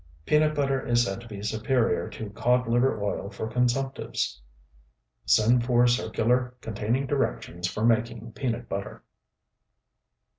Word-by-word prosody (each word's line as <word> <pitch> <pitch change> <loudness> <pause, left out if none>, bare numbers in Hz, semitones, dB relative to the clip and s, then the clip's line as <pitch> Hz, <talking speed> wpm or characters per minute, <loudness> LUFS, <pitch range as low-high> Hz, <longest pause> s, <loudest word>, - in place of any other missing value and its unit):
Peanut 155 0 +3
butter 135 -2 0
is 120 0 +3
said 95 0 -3
to 120 - -12
be 105 -3 -8
superior 115 +3 0
to 110 -2 -7
codliver 120 +1 +2
oil 100 -1 -2
for 110 - -5
consumptives. 125 - -1 0.9
Send 120 +3 +4
for 120 0 +4
circular 125 +1 +1
containing 115 +5 -1
directions 90 - -2
for 105 +4 -2
making 115 0 0
peanut 120 -1 -3
butter. 100 0 -5
120 Hz, 120 wpm, -27 LUFS, 110-125 Hz, 0.9 s, Send